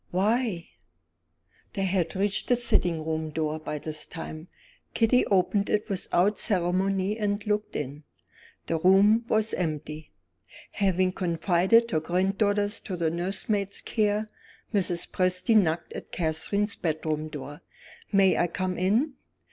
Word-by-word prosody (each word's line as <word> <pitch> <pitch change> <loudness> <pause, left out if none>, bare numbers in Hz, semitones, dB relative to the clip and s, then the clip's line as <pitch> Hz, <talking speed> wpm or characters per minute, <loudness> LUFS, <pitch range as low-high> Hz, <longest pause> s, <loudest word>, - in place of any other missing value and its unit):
"Why?" 205 -1 0 1.1
They 195 - -2
had 185 -3 0
reached 195 +1 0
the 245 - +4
sitting 175 -9 0
room 160 0 -2
door 155 0 -2
by 150 -1 -5
this 155 +1 -5
time. 160 -1 -8 0.5
Kitty 230 +2 +3
opened 200 +1 +1
it 210 +1 0
without 195 +1 +1
ceremony 195 +2 +1
and 205 0 -1
looked 210 0 -1
in. 145 +1 -5 0.6
The 165 - -1
room 200 +6 +5
was 220 -1 +1
empty. 155 -2 -4 0.6
Having 185 -2 +1
confided 185 +6 +2
her 160 - +2
granddaughter 195 +5 +1
to 205 -3 -3
the 165 -2 0
nursemaid's 195 +3 -1
care, 210 -1 0 0.5
Mrs. 180 -4 0
Presty 185 +5 +2
knocked 170 -5 +2
at - - -8
Catherine's 190 +6 0
bedroom 155 -3 -2
door. 145 0 -8 0.5
"May 195 -2 +4
I 175 - +2
come 185 +1 -3
in?" 225 - +1
185 Hz, 130 wpm, -27 LUFS, 165-205 Hz, 1.1 s, room